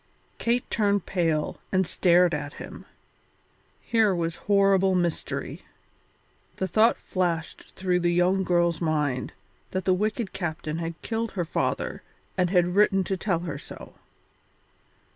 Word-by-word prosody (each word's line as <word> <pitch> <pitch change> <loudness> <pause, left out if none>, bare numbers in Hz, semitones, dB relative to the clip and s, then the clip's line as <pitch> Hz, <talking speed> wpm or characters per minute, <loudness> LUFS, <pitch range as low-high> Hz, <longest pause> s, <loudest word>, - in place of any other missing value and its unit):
Kate 240 +1 0
turned 205 -3 +1
pale 165 -5 0
and 190 0 +2
stared 175 0 +3
at 145 -1 -3
him; - - -10 1.0
here 220 -5 +3
was 165 -1 -2
horrible 195 -1 +4
mystery. 175 -2 -2 0.9
The 190 - -2
thought 220 +6 +4
flashed 170 -3 -3
through 180 -1 +1
the 175 0 +1
young 180 +2 +2
girl's 175 -2 +1
mind 150 -6 0 0.4
that 185 0 -3
the 185 - +4
wicked 210 +3 -1
captain 160 -2 -3
had 165 0 -5
killed 230 -1 -2
her 180 -3 -1
father - - -2 0.3
and 180 -2 +1
had 180 -1 +2
written 195 -1 +4
to 190 - -2
tell 185 -3 -1
her 155 -5 -5
so. - - -11
180 Hz, 135 wpm, -26 LUFS, 170-195 Hz, 1.0 s, horrible